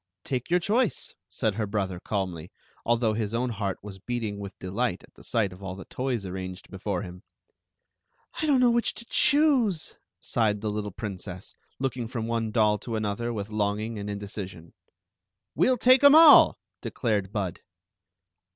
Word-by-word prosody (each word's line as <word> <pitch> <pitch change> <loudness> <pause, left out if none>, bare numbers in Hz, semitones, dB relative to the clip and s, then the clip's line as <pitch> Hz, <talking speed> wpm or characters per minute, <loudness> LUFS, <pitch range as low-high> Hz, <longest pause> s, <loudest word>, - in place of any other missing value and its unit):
" 100 - -61
"Take 130 -2 -3
your 175 +1 +3
choice," 220 +6 0 0.2
said 110 - -1
her 105 0 -2
brother, 95 -3 -2
calmly, 90 -4 -3 0.3
although 115 -1 +2
his 110 0 -2
own 125 +1 0
heart 100 -3 -3
was 100 -2 -9
beating 110 -2 -4
with 100 -1 -8
delight 115 +7 -2
at - - -19
the - - -17
sight 105 -5 0
of 90 - -14
all 95 -1 -5
the 95 - -10
toys 125 -5 -3
arranged 95 0 -7
before 95 -1 -3
him. 90 -1 -9 0.6
" - - -45
I 315 - 0
don't 280 -3 +4
know 245 -1 +5
which 235 0 0
to 235 - -8
choose," 275 - +2 0.2
sighed 105 -3 0
the 110 -1 -2
little 105 0 -3
princess, 95 -2 -7 0.2
looking 130 -3 -2
from 115 -1 -4
one 115 -1 -1
doll 105 -2 +2
to 115 +2 -5
another 110 +2 -2
with 105 -2 -5
long 105 -1 0
ing 110 0 -4
and 100 0 -5
indecision. 100 -4 -7 0.4
" - - -60
We 160 - +3
'11 255 -1 +3
take 255 +4 +5
'em 285 +1 +9
all," 320 -1 +8 0.2
declared 105 -5 -1
Bud. 95 -5 -3
110 Hz, 180 wpm, -27 LUFS, 100-125 Hz, 0.6 s, em